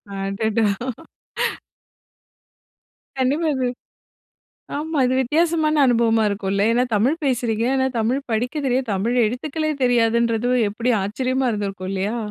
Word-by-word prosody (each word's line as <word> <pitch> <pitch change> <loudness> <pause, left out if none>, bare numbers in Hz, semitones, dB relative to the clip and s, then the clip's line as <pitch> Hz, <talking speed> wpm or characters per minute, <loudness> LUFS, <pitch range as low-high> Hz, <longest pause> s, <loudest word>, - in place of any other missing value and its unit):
அடடா! 205 +3 0 2.5
கண்டிப்பா. 280 +6 +1
இது 255 -1 0 1.1
ஆமா. 310 0 -2
இது 255 +1 +1
வித்தியாசமான 310 +2 +2
அனுபவமா 230 -2 +3
இருக்கும்ல. 200 0 -1
ஏன்னா 245 +2 +3
தமிழ் 250 +10 +2
பேசுறீங்க, 235 -3 0
ஆனா 265 0 +2
தமிழ் 250 +5 0
படிக்க 245 +6 -1
தெரியாது, 255 -1 0
தமிழ் 225 +6 0
எழுத்துக்களே 305 +7 -2
தெரியாதுன்றது 235 -1 +2 0.2
எப்படி 235 +4 -1
ஆச்சரியமா 255 +5 -1
இருந்துருக்கும். 195 -3 -4
இல்லையா? 200 +5 -2
240 Hz, 105 wpm, -21 LUFS, 220-265 Hz, 2.5 s, அனுபவமா